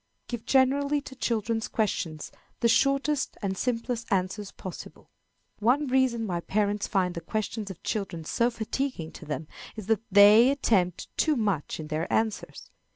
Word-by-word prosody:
Give 240 -2 -5
generally 280 +2 +3
to 270 -1 -10
children's 225 -2 -1
questions 165 -7 -2 0.3
the 235 - +4
shortest 275 +3 +2
and 190 -1 -1
simplest 235 +1 -2
answers 190 +1 -1
possible. 185 - -10 0.5
One 250 +7 +3
reason 255 -3 +2
why 175 -4 -2
parents 205 +3 0
find 185 -4 +1
the 170 - -5
questions 215 +3 -3
of 190 - -10
children 195 -6 -3
so 235 +9 +1
fatiguing 230 - -3
to - - -11
them, 155 +1 -4 0.3
is 215 -3 -7
that 220 +1 +1
they 205 +5 +8
attempt 195 - 0
too 310 - +3
much 200 - -1
in 155 -1 -7
their 155 +2 -2
answers. 220 -2 -2
220 Hz, 155 wpm, -27 LUFS, 190-250 Hz, 0.5 s, they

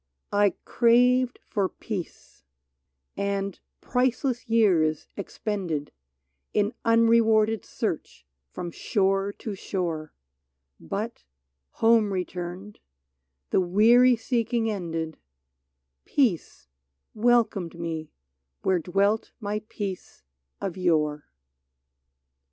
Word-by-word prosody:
I 205 -2 +3
craved 250 +1 +4
for 195 -3 0
peace, 180 - -7 0.7
and 200 -1 -2 0.2
priceless 250 0 0
years 170 -9 +3
expended 190 -7 -3 0.6
In 210 +2 +2
unrewarded 225 -2 +4
search 65 - -4 0.2
from 175 - -6
shore 195 +1 0
to 215 - -6
shore; 170 -5 -3 0.7
But - - -5 0.6
home 225 -3 +5
returned, 180 +2 -5 0.7
the - - +4
weary 230 +7 +5
seeking 230 -1 0
ended, 165 -5 -4 0.9
Peace 210 - 0 0.5
welcomed 215 -7 +1
me 160 -2 -4 0.5
where 185 -2 +2
dwelt 200 +6 0
my 210 -1 -3
peace 195 - -6 0.4
of 190 -2 -4
yore! 155 -5 +1
200 Hz, 85 wpm, -26 LUFS, 175-230 Hz, 0.9 s, home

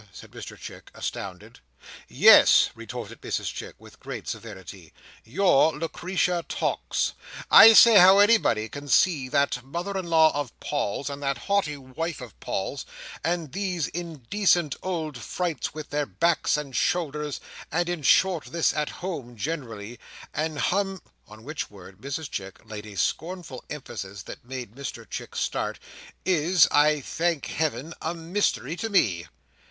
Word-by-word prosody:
said - - -13
Mr - - -9
Chick, - - -11
astounded. - - -6 0.5
"Yes," - - +7
retorted - - -8
Mrs - - -3
Chick, - - -8
with - - -17
great - - -7
severity, 95 -6 -8 0.3
"your 160 - +3
Lucretia 175 +2 -1
Tox—I 225 - +4
say 225 -1 +9
how 190 +2 +8
anybody 205 - +4
can 145 +5 -9
see 140 +1 +3
that 125 -2 +1
mother 175 +9 -5
in 190 -2 -3
law 160 -1 +5
of 145 -4 -4
Paul's, 140 -3 -2
and 140 0 -5
that 140 -1 -1
haughty 200 -8 0
wife 145 +5 -5
of 125 -6 -10
Paul's, - - -3 0.4
and 165 -2 -1
these 185 -2 -2
indecent 170 - 0
old 160 -7 -3
frights 155 - -3
with 155 -1 -8
their 145 -1 -1
backs 170 -3 +1
and 140 -3 -6
shoulders, 150 -4 -1 0.3
and 175 +2 0
in 175 -2 -3
short 175 +3 +3
this 170 -1 +1
at 150 -1 -1 0.2
home 135 -10 -5
generally, 120 -5 -5 0.3
and 155 0 -2
hum—" 195 +5 -1 0.2
on 110 +1 -14
which 155 +4 -5
word 95 -2 -14
Mrs 140 +3 -4
Chick 95 -5 -6
laid 110 -1 -8
a 100 -2 -10
scornful 165 - -3
emphasis 100 -9 -7
that - - -10
made 125 -3 -7
Mr 140 0 -7
Chick - - -7
start, - - -2 0.5
"is, 175 -1 +4
I 150 0 +4
thank 165 +2 -1
Heaven, 155 0 -2
a 160 +2 -2
mystery 165 -3 -1
to 225 +3 -3
me!" 95 - +2
150 Hz, 145 wpm, -26 LUFS, 130-175 Hz, 0.5 s, say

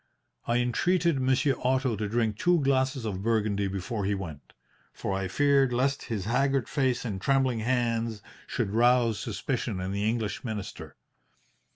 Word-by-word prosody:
I 120 - +2
entreated 165 +6 +1
Monsieur 130 +2 +2
Otto 130 -2 +1
to 105 0 -3
drink 110 -1 0
two 175 +9 +3
glasses 130 -2 +1
of 95 -3 -3
Burgundy 105 -2 +1
before 100 +3 -3
he 100 +1 0
went, 80 -8 -8 0.4
for 95 - -4
I 95 0 -1
feared 140 +4 +3
lest 135 +3 0
his 105 -6 -3
haggard 135 +2 +1
face 130 -5 0
and 100 -5 -4
trembling, 135 -2 +2
hands 115 -2 -1 0.2
should 100 - -2
rouse 120 0 +3
suspicion 95 - -3
in 95 +1 -3
the 100 +2 0
English 110 -3 -2
minister. 110 -5 -6
115 Hz, 155 wpm, -28 LUFS, 105-130 Hz, 0.4 s, two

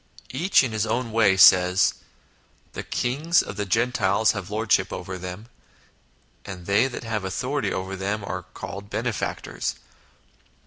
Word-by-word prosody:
Each 165 +5 +3
in 130 - -2
his 110 0 -1
own 120 +1 -1
way 110 -4 +3
says, 90 0 +6 0.4
" - - -36
The - - -4
kings 150 +8 +1
of - - -7
the 105 0 -3
Gentiles 110 -1 +2
have 100 -3 -6
lordship 110 +1 +1
over 95 0 -6
them; 90 +4 -7 1.0
and 90 -3 -9
they 100 +7 +3
that 125 - -7
have 110 -3 -3
authority 125 +9 -2
over 95 +1 -4
them 100 +2 -3
are 95 -1 -4
called 100 +1 -7
Benefactors. - - -3
105 Hz, 145 wpm, -24 LUFS, 95-120 Hz, 1.0 s, says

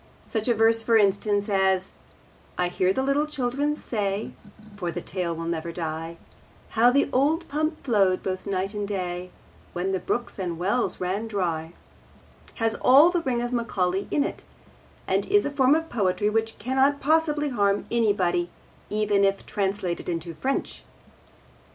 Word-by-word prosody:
Such 220 0 -3
a 240 - +3
verse, 225 +1 +3
for 225 0 +3
instance, 205 0 +2
as: 190 -2 +1 0.7
I 180 0 +1
hear 185 +1 +1
the 265 +7 0
little 280 +2 +1
children 285 +1 -1
say 205 -6 -3 0.4
(For 180 -4 -3
the 175 - -4
tale 175 -1 -3
will 165 0 -5
never 170 0 -3
die) 165 0 -5 0.5
How 235 +2 +4
the 280 +3 +3
old 300 +6 +2
pump 310 +2 -2
flowed 195 -7 +2
both 185 0 -4
night 195 +1 -1
and 205 -1 -3
day 180 -2 -3 0.4
When 185 +2 -1
the 190 - 0
brooks 240 +1 -3
and 180 -3 -2
the - - -7
wells 200 +8 -1
ran 190 +5 -2
dry, 170 -6 -2 0.8
has 225 -1 0
all 285 +7 +7
the 350 -1 0
ring 245 -5 -1
of 240 +1 -3
Macaulay 195 -5 -1
in 290 - +2
it, - - -5 0.6
and - - +1
is 410 +1 +3
a 285 - -1
form 275 0 +4
of 325 0 -1
poetry 210 - 0
which 225 +1 -1
cannot 265 +5 +2
possibly 300 -1 +2
harm 200 -5 +1
anybody, 190 -7 +1 0.4
even 210 -1 +1
if 195 0 +1
translated 195 -4 -2
into 170 0 -3
French. 265 - -3
205 Hz, 165 wpm, -25 LUFS, 185-255 Hz, 0.8 s, all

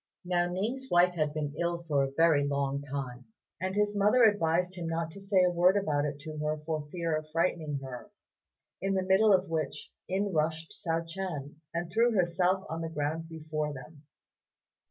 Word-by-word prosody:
Now 175 -1 +1
Ning's 240 +9 -3
wife 175 +1 +5
had 155 -3 0
been 150 -1 -3
ill 170 0 -1
for 145 -3 +2 0.2
a 160 -4 +5
long 140 -1 -1
time, 130 -3 -5 0.4
and 190 +1 -2
his 210 0 +1
mother 210 +5 +4
advised 180 -4 +3
him 175 -3 -5
not 165 0 -2
to 195 - -11
say 195 -1 +3
a 180 - +3
word 180 +3 +4
about 150 -7 +1
it 145 -1 -3
to 155 0 -7
her 150 0 -1
for 155 -2 -2
fear 170 -3 -1
of 155 0 -4
frightening 160 -2 0
her; 130 +8 -8 0.7
in 195 0 0
the 190 - +1
middle 190 +3 +5
of 190 -1 +4
which 160 -4 -3 0.2
in 195 +1 -1
rushed 160 +1 0
Hsiao 165 0 -2
ch'ien, 165 -5 -5
and 170 0 -3
threw 230 +4 +3
herself 185 0 +2
on 165 +1 -4
the 165 - -3
ground 160 +1 -3
before 155 -2 -3
them. 140 +3 -11
165 Hz, 185 wpm, -30 LUFS, 150-185 Hz, 0.7 s, wife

